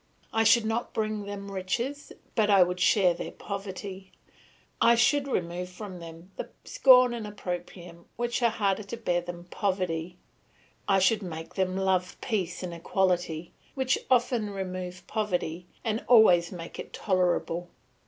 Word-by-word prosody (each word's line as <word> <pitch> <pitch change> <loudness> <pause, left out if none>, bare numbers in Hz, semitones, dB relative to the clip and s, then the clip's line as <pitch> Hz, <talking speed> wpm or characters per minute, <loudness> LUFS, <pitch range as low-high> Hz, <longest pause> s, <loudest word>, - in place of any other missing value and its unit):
I 225 - +3
should 230 0 +5
not 225 +2 -2
bring 215 -1 -1
them 200 0 -6
riches, 235 +10 -3 0.2
but 215 -2 +2
I 195 -2 +7
should 180 0 -3
share 185 -3 +4
their - - -6
poverty; 195 -1 -7 0.7
I 235 0 +6
should 280 +4 +3
remove 180 -6 -2
from 185 0 -8
them 165 +2 -11
the - - -5 0.2
scorn 255 -2 +6
and 225 -3 -5
opprobrium 175 -3 -7
which 240 +2 -1
are 235 - +4
harder 205 -2 0
to 215 +3 -7
bear 175 -6 0
than 175 0 -7
poverty. 180 -2 -2 0.7
I 195 -1 +4
should 195 +3 +3
make 165 -4 -7
them 185 -1 0
love 185 -2 0
peace 190 -8 -2
and 175 -1 -4
equality, 175 -1 -1 0.2
which 265 -1 +1
often 240 -4 +2
remove 185 -2 -5
poverty, 180 -5 -2 0.2
and 220 -1 -1
always 180 -8 +6
make 170 -2 -8
it - - -8
tolerable. 175 -2 0
190 Hz, 150 wpm, -28 LUFS, 180-220 Hz, 0.7 s, I